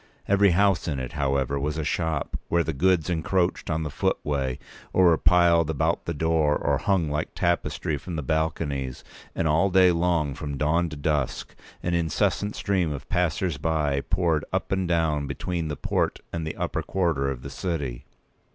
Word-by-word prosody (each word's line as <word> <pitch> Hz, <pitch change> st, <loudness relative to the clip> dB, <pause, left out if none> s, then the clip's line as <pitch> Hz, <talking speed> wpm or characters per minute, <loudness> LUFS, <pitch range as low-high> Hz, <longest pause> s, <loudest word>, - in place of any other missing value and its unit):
Every 100 Hz, 0 st, +5 dB
house 95 Hz, +1 st, +2 dB
in 75 Hz, -4 st, -1 dB
it, 65 Hz, -1 st, -4 dB
however, 70 Hz, -1 st, 0 dB
was 75 Hz, +2 st, -2 dB
a 80 Hz, -, -1 dB
shop, 80 Hz, 0 st, -1 dB
where 85 Hz, 0 st, +3 dB
the 80 Hz, -, -2 dB
goods 90 Hz, +2 st, +2 dB
encroached 90 Hz, +1 st, 0 dB
on 80 Hz, 0 st, 0 dB
the 75 Hz, -, -4 dB
footway, 65 Hz, -3 st, -1 dB, 0.4 s
or 95 Hz, -, +5 dB
were 85 Hz, -2 st, +5 dB
piled 85 Hz, -3 st, +4 dB
about 75 Hz, -4 st, 0 dB
the 85 Hz, -, -2 dB
door, 80 Hz, -1 st, +2 dB
or -, -, 0 dB
hung 95 Hz, -5 st, +1 dB
like 75 Hz, +2 st, -3 dB
tapestry 85 Hz, -3 st, 0 dB
from 85 Hz, +5 st, -7 dB
the 75 Hz, -, -3 dB
balconies; 75 Hz, -4 st, -2 dB, 0.3 s
and 85 Hz, -, 0 dB
all 80 Hz, +6 st, +3 dB
day 95 Hz, -1 st, +5 dB
long, 85 Hz, -4 st, +1 dB
from 70 Hz, 0 st, -5 dB
dawn 85 Hz, +4 st, +1 dB
to 75 Hz, -, -7 dB
dusk, 75 Hz, -2 st, -2 dB, 0.3 s
an 85 Hz, -, -1 dB
incessant 85 Hz, +5 st, 0 dB
stream 95 Hz, -6 st, 0 dB
of 70 Hz, -1 st, -7 dB
passers 90 Hz, -3 st, 0 dB
by 75 Hz, -3 st, 0 dB
p. 85 Hz, -, -2 dB
193poured 80 Hz, -4 st, +2 dB
up -, -, -2 dB
and 95 Hz, -1 st, 0 dB
down 80 Hz, -4 st, +1 dB
between 80 Hz, +4 st, -3 dB
the 75 Hz, -, -3 dB
port -, -, -1 dB, 0.2 s
and 80 Hz, -2 st, -3 dB
the -, -, -4 dB
upper -, -, -2 dB
quarter 80 Hz, -8 st, 0 dB
of 65 Hz, -2 st, -5 dB
the 70 Hz, -, -7 dB
city. 70 Hz, -6 st, -3 dB
80 Hz, 185 wpm, -25 LUFS, 75-85 Hz, 0.4 s, Every